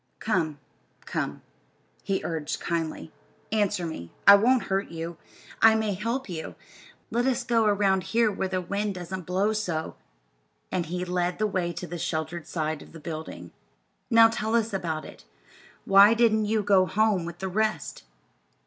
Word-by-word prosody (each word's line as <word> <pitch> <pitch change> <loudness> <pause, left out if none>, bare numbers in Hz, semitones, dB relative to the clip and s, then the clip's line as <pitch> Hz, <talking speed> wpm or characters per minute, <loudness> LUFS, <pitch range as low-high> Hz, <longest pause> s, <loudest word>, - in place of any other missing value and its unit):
"Come, 165 -9 -1 0.5
come," - - -3 0.6
he 195 - -1
urged 160 -2 -3
kindly. 165 - -3 0.4
"Answer 205 -4 +1
me. 85 - -7
I 200 - +11
won't 240 +5 +4
hurt 195 +1 -1
you. 165 0 -6 0.4
I 225 0 +7
may 220 -2 0
help 230 +7 -3
you. 165 -4 -6 0.6
Let 240 +3 +1
us 260 -1 0
go 235 -2 +2
around 200 -2 +2
here 230 -1 +2
where 190 -1 -2
the 185 0 -2
wind 200 +2 -2
doesn't 180 0 -6
blow 195 +4 +1
so." 175 -7 -3 0.8
And 175 -3 -1
he 180 +2 -3
led 180 0 -1
the 215 - +1
way 185 -4 -1
to 180 - -6
the 175 -1 -6
sheltered 160 +1 -3
side 155 -2 -2
of - - -14
the 165 - -10
building. 155 0 -7 0.6
"Now 230 -1 +7
tell 225 0 -2
us 225 -2 +1
all 195 - 0
about 160 -3 -3
it. - - -13 0.6
Why 200 +3 +7
didn't 220 -2 +3
you 215 0 0
go 195 -2 +4
home 215 -3 +2
with 170 0 -7
the 190 - -4
rest?" 215 +3 -1
190 Hz, 165 wpm, -26 LUFS, 170-215 Hz, 0.8 s, I